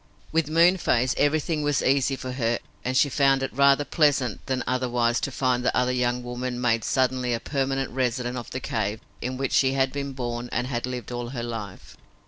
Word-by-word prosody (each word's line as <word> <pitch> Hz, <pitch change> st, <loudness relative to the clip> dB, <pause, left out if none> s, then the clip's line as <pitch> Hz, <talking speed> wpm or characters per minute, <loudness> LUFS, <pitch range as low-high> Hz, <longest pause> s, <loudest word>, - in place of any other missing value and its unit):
With 160 Hz, -2 st, +1 dB
Moonface, 165 Hz, -7 st, +3 dB
everything 155 Hz, +2 st, +1 dB
was 145 Hz, -3 st, +1 dB
easy 135 Hz, 0 st, +2 dB
for 130 Hz, 0 st, -6 dB
her 120 Hz, -2 st, 0 dB, 0.3 s
and 130 Hz, +1 st, 0 dB
she 145 Hz, -, +5 dB
found 135 Hz, -1 st, +2 dB
it 135 Hz, -, -3 dB
rather 140 Hz, +2 st, +4 dB
pleasant 140 Hz, -, +1 dB
than 130 Hz, -1 st, -1 dB
otherwise 125 Hz, -2 st, +1 dB
to 140 Hz, -, -3 dB
find 125 Hz, -1 st, 0 dB
the -, -, +1 dB
other 125 Hz, 0 st, +2 dB
young 125 Hz, -1 st, 0 dB
woman 125 Hz, 0 st, -4 dB
made 115 Hz, -2 st, +1 dB
suddenly 130 Hz, -2 st, +1 dB
a -, -, -4 dB
permanent 135 Hz, 0 st, -2 dB
resident 125 Hz, -1 st, -1 dB
of 120 Hz, -2 st, -6 dB
the 130 Hz, -, -4 dB
cave 110 Hz, -3 st, -2 dB, 0.2 s
in 130 Hz, +1 st, -3 dB
which 135 Hz, 0 st, -2 dB
she 135 Hz, -1 st, +4 dB
had 135 Hz, -1 st, +1 dB
been 140 Hz, -1 st, -4 dB
born 120 Hz, -1 st, -4 dB
and 120 Hz, -, -1 dB
had 125 Hz, -1 st, -3 dB
lived 125 Hz, -2 st, -5 dB
all 120 Hz, -1 st, -4 dB
her 120 Hz, -2 st, -5 dB
life. 110 Hz, -5 st, -7 dB
130 Hz, 200 wpm, -25 LUFS, 120-135 Hz, 0.3 s, she